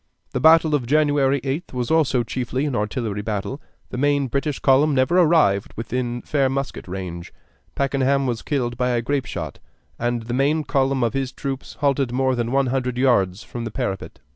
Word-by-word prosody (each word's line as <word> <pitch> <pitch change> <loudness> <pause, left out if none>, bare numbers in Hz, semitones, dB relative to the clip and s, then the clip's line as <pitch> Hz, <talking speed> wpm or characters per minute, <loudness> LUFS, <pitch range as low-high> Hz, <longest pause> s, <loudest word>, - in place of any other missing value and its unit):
The - - -1
battle 160 0 +6
of 135 -5 0
January 145 -1 +3
8th 135 +5 -4
was 125 +2 -2
also 145 -6 +3
chiefly 130 +3 -2
an 140 -4 -2
artillery 105 0 -2
battle: 105 +6 -4 0.3
the 125 - -4
main 145 0 +2
British 140 +2 -1
column 140 +2 +3
never 135 +8 +3
arrived 155 - +3
within 120 +1 -3
fair 140 -3 +1
musket 135 -4 -4
range; 90 -2 -6 0.4
Pakenham 140 0 +1
was 120 -3 -2
killed 120 -5 -2
by 125 0 +1
a 120 -1 0
grape 135 +1 -1
shot, 80 -6 -5 0.4
and 120 -1 -1
the 120 +2 -5
main 145 +4 +2
column 135 -3 +1
of 120 - 0
his 135 -1 -2
troops 135 0 -5
halted 140 -3 +1
more 130 +1 +1
than 120 -1 -2
one 135 +1 +2
hundred 125 -2 -1
yards 110 -6 +2
from 120 - -6
the 115 - -3
parapet. 110 -5 -4
130 Hz, 185 wpm, -22 LUFS, 120-140 Hz, 0.4 s, battle